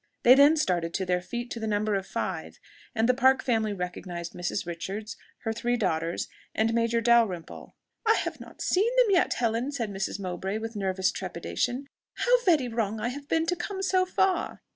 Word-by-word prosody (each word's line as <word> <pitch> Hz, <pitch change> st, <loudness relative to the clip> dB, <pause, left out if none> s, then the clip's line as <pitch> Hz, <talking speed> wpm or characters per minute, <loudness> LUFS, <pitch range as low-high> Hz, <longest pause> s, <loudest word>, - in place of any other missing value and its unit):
They 245 Hz, -, +9 dB
then 285 Hz, +4 st, +6 dB
started 175 Hz, -, 0 dB
to 190 Hz, -, -1 dB
their 180 Hz, 0 st, +1 dB
feet 240 Hz, +6 st, -5 dB
to 230 Hz, -, -4 dB
the 220 Hz, -, -3 dB
number 210 Hz, 0 st, 0 dB
of 195 Hz, -1 st, -1 dB
five; -, -, -4 dB, 0.4 s
and 225 Hz, 0 st, +2 dB
the 255 Hz, -, +5 dB
Park 265 Hz, +1 st, +4 dB
family 220 Hz, -4 st, +1 dB
recognized 180 Hz, -2 st, -5 dB
Mrs. 175 Hz, +2 st, -3 dB
Richards, 190 Hz, +6 st, -5 dB, 0.3 s
her 225 Hz, -, -1 dB
three 240 Hz, +2 st, 0 dB
daughters, 170 Hz, -5 st, -1 dB, 0.3 s
and 225 Hz, +1 st, +2 dB
Major 230 Hz, 0 st, +1 dB
Dalrymple. 225 Hz, -8 st, +1 dB, 0.3 s
"I 445 Hz, -1 st, +4 dB
have -, -, -3 dB
not -, -, -9 dB
seen 400 Hz, +5 st, +2 dB
them -, -, +5 dB
yet, 360 Hz, -, +3 dB
Helen!" 235 Hz, +3 st, 0 dB
said 235 Hz, -7 st, -3 dB
Mrs. 195 Hz, +1 st, -3 dB
Mowbray 190 Hz, +2 st, -3 dB
with 225 Hz, +1 st, -6 dB
nervous 190 Hz, -2 st, 0 dB
trepidation: 255 Hz, +3 st, -3 dB, 0.3 s
"how -, -, +3 dB
very 310 Hz, -9 st, +4 dB
wrong 220 Hz, -2 st, -2 dB
I 230 Hz, +3 st, -1 dB
have 285 Hz, +3 st, -7 dB
been 325 Hz, +1 st, +1 dB
to 355 Hz, +2 st, 0 dB
come 385 Hz, +2 st, -4 dB
so 370 Hz, -1 st, +3 dB
far!" 375 Hz, -1 st, 0 dB
225 Hz, 190 wpm, -27 LUFS, 195-265 Hz, 0.4 s, They